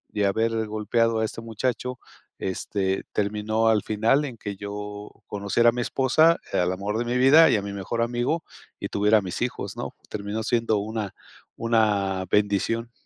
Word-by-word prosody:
y 105 - 0
de - - +3
haber 110 +2 0
golpeado 110 +2 +1
a 110 - +2
este 115 - -6
muchacho, 125 +2 -3 0.4
este, 95 0 -2
terminó 105 +2 0
al 110 -2 +4
final 115 +7 +2
en 125 -5 -7
que 105 -2 -5
yo 105 +1 -7 0.2
conociera 105 +3 +2
a - - +3
mi 120 +1 -3
esposa, 145 +7 +3
al 90 0 +2
amor 100 +3 -2
de 120 - -1
mi 120 +1 0
vida 145 +6 +7
y - - +4
a 100 - -3
mi 100 0 -5
mejor 100 +4 -3
amigo 120 +7 -1 0.4
y - - -4
tuviera 105 +2 +4
a - - -5
mis 90 +3 -5
hijos, 125 - -3
¿no?, - - -5 0.2
terminó 105 +1 -4
siendo 115 -2 +1
una 105 -1 -3 0.4
una 105 -5 +1
bendición. 105 +3 +1
110 Hz, 180 wpm, -25 LUFS, 100-115 Hz, 0.4 s, vida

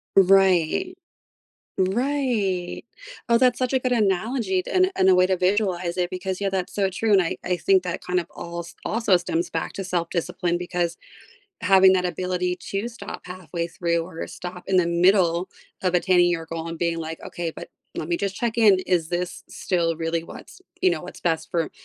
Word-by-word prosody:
Right. 195 - +4 0.8
Right. 205 -3 0 0.5
Oh, 235 0 +5
that's 250 -1 +4
such 255 0 -1
a 260 - +3
good 255 0 -1
analogy 210 -2 +1
t - - -9
and 370 +1 +3
and 190 - +4
a 185 - +6
way 180 0 +5
to 190 0 +1
visualize 185 -2 0
it 175 -1 0
because 185 0 -3
yeah, 200 -1 0
that's 190 -2 -3
so 200 -1 +2
true, 220 +4 -1
and 195 - +6
I 165 - -2
I 180 0 0
think 190 +2 +3
that 180 -1 -4
kind 180 0 +1
of 170 - -6
als 170 0 -7
also 220 -4 +3
stems 175 0 -2
back 165 - -3
to 195 - -5
self-discipline 175 0 -1
because 175 -1 -2 0.6
having 190 0 +6
that 180 -1 +1
ability 180 +1 -1
to 200 +4 -2
stop 230 -1 -8
halfway 175 -2 -5
through 170 -1 -1
or 165 -1 -7
stop 180 0 -8
in 190 - +3
the 180 - +4
middle 175 0 +3 0.3
of 180 -1 +1
attaining 175 0 +4
your 165 -2 -2
goal 165 0 -5
and 165 0 -5
being 170 0 -1
like, 160 0 -5
"Okay, 170 -1 -4
but - - -9 0.3
let 155 - -4
me 170 - +1
just 195 +2 -3
check 235 +2 -1
in, 210 -4 +6
is 170 -3 +1
this 180 0 -3
still 170 -3 -1
really 165 +1 -1
what's, 270 - -12 0.2
you 375 - +6
know, 345 - -2
what's - - -10
best 165 -2 -1
for 165 -2 -1
180 Hz, 195 wpm, -24 LUFS, 170-195 Hz, 0.8 s, a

